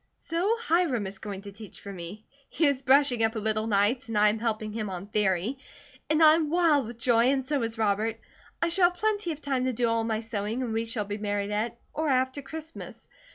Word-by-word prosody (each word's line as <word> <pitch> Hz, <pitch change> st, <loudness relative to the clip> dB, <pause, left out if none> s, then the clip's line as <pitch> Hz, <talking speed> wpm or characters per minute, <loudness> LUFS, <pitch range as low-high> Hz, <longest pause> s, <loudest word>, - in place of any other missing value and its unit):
So 360 Hz, +7 st, 0 dB
Hiram 335 Hz, -, +1 dB
is 190 Hz, 0 st, -5 dB
going 200 Hz, -2 st, -7 dB
to 200 Hz, -, -8 dB
teach 210 Hz, 0 st, -12 dB
for 200 Hz, -, -8 dB
me. 185 Hz, +4 st, -9 dB, 0.2 s
He 325 Hz, -, +1 dB
is 280 Hz, -2 st, +2 dB
brushing 265 Hz, -3 st, +4 dB
up 225 Hz, +1 st, +1 dB
a -, -, -2 dB
little 215 Hz, 0 st, -1 dB
nights 215 Hz, +5 st, +1 dB
and 225 Hz, -2 st, -2 dB
I 210 Hz, 0 st, +5 dB
am 215 Hz, +1 st, -2 dB
helping 215 Hz, -2 st, -2 dB
him 215 Hz, -2 st, -3 dB
on 185 Hz, 0 st, -6 dB
"theory," 210 Hz, +4 st, 0 dB, 0.5 s
and 310 Hz, +1 st, +4 dB
I 310 Hz, 0 st, +9 dB
am 315 Hz, -2 st, +1 dB
wild 315 Hz, -7 st, +3 dB
with 235 Hz, 0 st, -9 dB
joy, 235 Hz, -1 st, +3 dB
and 265 Hz, 0 st, +1 dB
so 285 Hz, 0 st, 0 dB
is 225 Hz, 0 st, -3 dB
Robert. 220 Hz, +1 st, 0 dB, 0.4 s
I 335 Hz, -, +2 dB
shall 350 Hz, +1 st, +5 dB
have 355 Hz, -, -15 dB
plenty 415 Hz, -3 st, 0 dB
of 305 Hz, -1 st, -7 dB
time 265 Hz, -3 st, -1 dB
to 260 Hz, -, 0 dB
do 240 Hz, +1 st, +1 dB
all 230 Hz, 0 st, +1 dB
my 220 Hz, -1 st, -1 dB
sewing 225 Hz, +2 st, -3 dB
and 230 Hz, -3 st, -3 dB
we 225 Hz, +1 st, -1 dB
shall 225 Hz, -2 st, -2 dB
be 205 Hz, +1 st, -5 dB
married 205 Hz, -1 st, -2 dB
at, 220 Hz, +3 st, -2 dB, 0.2 s
or 315 Hz, 0 st, -1 dB
after, 260 Hz, +1 st, +1 dB
Christmas. 315 Hz, +3 st, -9 dB
230 Hz, 235 wpm, -27 LUFS, 210-285 Hz, 0.5 s, I